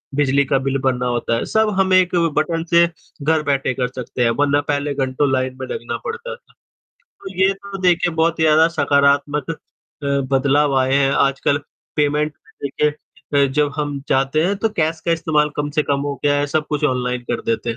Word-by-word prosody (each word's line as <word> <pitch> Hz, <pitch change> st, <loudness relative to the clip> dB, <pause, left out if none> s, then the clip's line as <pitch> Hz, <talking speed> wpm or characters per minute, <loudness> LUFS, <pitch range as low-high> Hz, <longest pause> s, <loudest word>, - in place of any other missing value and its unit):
बिजली 140 Hz, 0 st, +2 dB
का 135 Hz, +1 st, +1 dB
बिल 135 Hz, +1 st, -1 dB
भरना 130 Hz, -2 st, 0 dB
होता 120 Hz, -1 st, -1 dB
है, -, -, -2 dB
सब 220 Hz, 0 st, +2 dB
हम 190 Hz, -1 st, +2 dB
एक 185 Hz, -1 st, +4 dB, 0.2 s
बटन 165 Hz, +2 st, 0 dB
से 170 Hz, 0 st, +5 dB, 0.4 s
घर 160 Hz, +1 st, +2 dB
बैठे 140 Hz, -3 st, 0 dB
कर 125 Hz, 0 st, -1 dB
सकते 125 Hz, 0 st, -4 dB
हैं, 115 Hz, -, +3 dB
वरना 145 Hz, +3 st, +2 dB
पहले 145 Hz, 0 st, -2 dB
घंटों 135 Hz, +1 st, 0 dB
लाइन 130 Hz, 0 st, -1 dB
में 130 Hz, -, -4 dB
लगना 120 Hz, -, -4 dB
पड़ता 475 Hz, +2 st, -5 dB
था। -, -, -26 dB, 0.7 s
तो 195 Hz, 0 st, -7 dB
ये 190 Hz, +1 st, +4 dB
तो 195 Hz, 0 st, -9 dB
देखिए 175 Hz, -1 st, +2 dB
बहुत 165 Hz, +1 st, +1 dB
ही 160 Hz, -, +2 dB
ज़्यादा 155 Hz, +1 st, +5 dB
सकारात्मक 145 Hz, -1 st, +1 dB
अ, 165 Hz, -, -3 dB, 0.7 s
बदलाव 140 Hz, +1 st, +2 dB
आए 130 Hz, +1 st, +1 dB
हैं, 140 Hz, -1 st, +3 dB
आजकल 140 Hz, +1 st, +1 dB, 0.4 s
पेमेंट 150 Hz, 0 st, +1 dB, 0.3 s
देखिए 145 Hz, +2 st, 0 dB, 0.5 s
अ, -, -, +3 dB
जब 145 Hz, +1 st, 0 dB
हम 145 Hz, -2 st, -3 dB
जाते 135 Hz, +4 st, +1 dB
हैं 200 Hz, +3 st, 0 dB
तो 225 Hz, +3 st, 0 dB
कैश 160 Hz, 0 st, 0 dB
का 170 Hz, -, +3 dB
इस्तेमाल 155 Hz, -2 st, +1 dB
कम 145 Hz, 0 st, -2 dB
से 150 Hz, +1 st, +1 dB
कम 140 Hz, -1 st, -1 dB
हो 145 Hz, 0 st, -2 dB
गया 145 Hz, 0 st, +3 dB
है, 145 Hz, -, 0 dB
सब 150 Hz, +1 st, -1 dB
कुछ 150 Hz, 0 st, -1 dB
ऑनलाइन 125 Hz, -3 st, 0 dB
कर 120 Hz, -, -2 dB
देते 115 Hz, +1 st, -1 dB
हैं, 115 Hz, -, -5 dB
145 Hz, 205 wpm, -19 LUFS, 135-160 Hz, 0.7 s, से